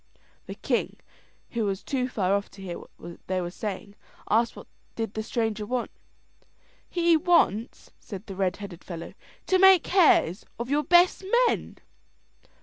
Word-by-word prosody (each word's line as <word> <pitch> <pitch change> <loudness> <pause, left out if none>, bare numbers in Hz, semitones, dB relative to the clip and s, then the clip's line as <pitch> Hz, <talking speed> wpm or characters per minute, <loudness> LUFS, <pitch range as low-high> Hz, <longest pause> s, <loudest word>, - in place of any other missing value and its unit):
The - - -6
king, - - -2 0.5
who 230 -2 -1
was 195 -2 -2
too 255 -2 -1
far 195 -5 0
off 200 0 -1
to 195 - -14
hear 175 -2 -6 0.2
what 170 0 -10
they 185 0 0
were 175 -1 -4
saying, 200 0 -6 0.4
asked 230 +2 +2
what - - -11 0.3
did 225 -2 -3
the 220 - -3
stranger 220 -1 -2
want. 245 +3 -3 1.0
"He 340 -1 +3
wants," 310 - +1
says 195 -2 -9
the 195 - -8
red 185 -1 0
headed 195 -4 -9
fellow, 170 -2 -8 0.3
"to 375 - +2
make 380 -3 +7
hares 295 - +4
of 240 +3 -5
your 295 +1 +2
best 355 +3 +4 0.2
men." - - -2
220 Hz, 155 wpm, -26 LUFS, 195-295 Hz, 1.0 s, make